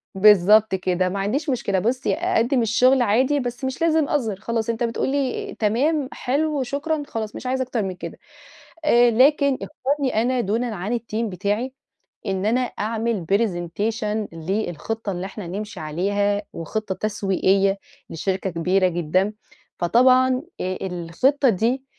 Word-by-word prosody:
بالضبط 210 Hz, +1 st, +6 dB
كده، 185 Hz, 0 st, 0 dB
ما 195 Hz, +1 st, -3 dB
عنديش 275 Hz, +10 st, -1 dB
مشكلة. 200 Hz, -7 st, 0 dB
بُصّي، 245 Hz, +6 st, 0 dB
أقدّم 295 Hz, -7 st, +1 dB
الشغل 250 Hz, +4 st, +4 dB
عادي 255 Hz, +6 st, +2 dB
بس 245 Hz, 0 st, -5 dB
مش 260 Hz, +4 st, -4 dB
لازم 320 Hz, -3 st, +2 dB
اظهر، 230 Hz, -9 st, 0 dB
خلاص 230 Hz, 0 st, -2 dB
أنت 230 Hz, +1 st, -1 dB
بتقول 230 Hz, +3 st, -1 dB
لي: 275 Hz, -2 st, -2 dB
"تمام، 265 Hz, +7 st, +1 dB
حلو، 285 Hz, +1 st, -1 dB
شكرًا." 290 Hz, +4 st, -2 dB
خلاص 220 Hz, -4 st, -5 dB
مش -, -, -8 dB
عايزة 260 Hz, +1 st, 0 dB
أكتر 240 Hz, -4 st, -2 dB
من 185 Hz, -1 st, -4 dB
كده -, -, -8 dB, 0.7 s
آآ، 240 Hz, -4 st, +5 dB
لكن 280 Hz, +3 st, +4 dB
اختارني 275 Hz, -5 st, -1 dB
أنا 250 Hz, +1 st, +1 dB
دونًا 225 Hz, +2 st, -1 dB
عن 205 Hz, +7 st, -2 dB
الteam 230 Hz, 0 st, -3 dB
بتاعي 205 Hz, +6 st, -2 dB, 0.5 s
إن 190 Hz, +1 st, -1 dB
أنا 240 Hz, +4 st, +2 dB
أعمل 225 Hz, -5 st, -2 dB
presentation 210 Hz, +2 st, -1 dB
للخطة 200 Hz, +4 st, -3 dB
اللي 180 Hz, +1 st, -4 dB
إحنا 195 Hz, -2 st, -8 dB
نمشي 205 Hz, +3 st, -6 dB
عليها، 200 Hz, +6 st, 0 dB
وخطة 190 Hz, +4 st, -3 dB
تسويقية 195 Hz, -1 st, +1 dB, 0.3 s
لشركة 190 Hz, +3 st, -2 dB
كبيرة 180 Hz, +3 st, +2 dB
جدًا، 180 Hz, +4 st, 0 dB, 0.5 s
فطبعًا 255 Hz, -, +4 dB, 0.2 s
آآ، 185 Hz, 0 st, -2 dB
الخطة 190 Hz, -, +1 dB
دي 235 Hz, +7 st, 0 dB
220 Hz, 140 wpm, -22 LUFS, 195-255 Hz, 0.7 s, بالضبط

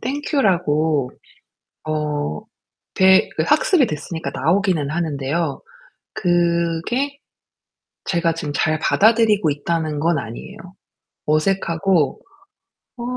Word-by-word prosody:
"Thank 285 Hz, +6 st, -4 dB
you." 275 Hz, -, +3 dB
라고 155 Hz, -, +1 dB, 0.8 s
어 150 Hz, -, -2 dB, 0.5 s
대 190 Hz, 0 st, +5 dB
그 -, -, +1 dB
학습이 375 Hz, -, +3 dB
됐으니까 160 Hz, 0 st, -5 dB
나오기는 165 Hz, -2 st, 0 dB
하는데요. 155 Hz, -1 st, -2 dB, 0.5 s
그게 175 Hz, +8 st, 0 dB, 0.9 s
제가 170 Hz, -2 st, 0 dB
지금 150 Hz, -3 st, -5 dB
잘 155 Hz, +1 st, +1 dB
받아들이고 215 Hz, -2 st, +3 dB
있다는 155 Hz, +1 st, -2 dB
건 165 Hz, -1 st, +1 dB
아니에요. 120 Hz, -, -8 dB, 0.7 s
어색하고 165 Hz, -1 st, +1 dB, 0.8 s
'어 -, -, -6 dB
170 Hz, 240 characters per minute, -20 LUFS, 150-195 Hz, 0.9 s, 대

